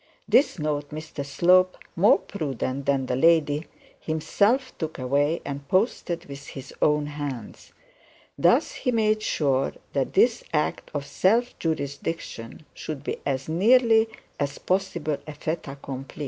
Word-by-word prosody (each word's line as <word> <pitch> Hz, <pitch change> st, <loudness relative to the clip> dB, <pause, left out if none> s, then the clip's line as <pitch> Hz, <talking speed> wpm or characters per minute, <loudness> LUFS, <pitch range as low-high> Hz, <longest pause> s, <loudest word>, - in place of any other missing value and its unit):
This 275 Hz, -, +4 dB
note 150 Hz, -2 st, -2 dB
Mr 155 Hz, -1 st, -6 dB
Slope, 180 Hz, +6 st, +3 dB, 0.2 s
more 195 Hz, +4 st, +6 dB
prudent 140 Hz, -, -4 dB
than 135 Hz, -2 st, +2 dB
the 125 Hz, -, -1 dB
lady, 155 Hz, +1 st, +3 dB, 0.3 s
himself 210 Hz, -, +1 dB
took 160 Hz, -1 st, -4 dB
away 145 Hz, +5 st, +1 dB
and 140 Hz, 0 st, -6 dB
posted 180 Hz, -, 0 dB
with 140 Hz, 0 st, -10 dB
his 135 Hz, -1 st, -9 dB
own 150 Hz, 0 st, +3 dB
hands. 145 Hz, -6 st, -6 dB, 0.6 s
Thus -, -, +3 dB
he 250 Hz, -, -2 dB
made 215 Hz, -2 st, +2 dB
sure 135 Hz, -9 st, +1 dB, 0.2 s
that 135 Hz, -2 st, -1 dB
this 230 Hz, +4 st, +3 dB
act 150 Hz, -1 st, -1 dB
of 140 Hz, -1 st, -2 dB
self 230 Hz, +11 st, +2 dB
jurisdiction 150 Hz, -4 st, -4 dB
should 150 Hz, -3 st, -6 dB
be -, -, -3 dB
as 135 Hz, -1 st, -1 dB
nearly 225 Hz, +6 st, +4 dB, 0.3 s
as 140 Hz, 0 st, -2 dB
possible 170 Hz, -5 st, -1 dB
a 155 Hz, -, -7 dB
fait 160 Hz, +2 st, -3 dB
accompli. 135 Hz, 0 st, -8 dB
150 Hz, 135 wpm, -25 LUFS, 140-185 Hz, 0.6 s, more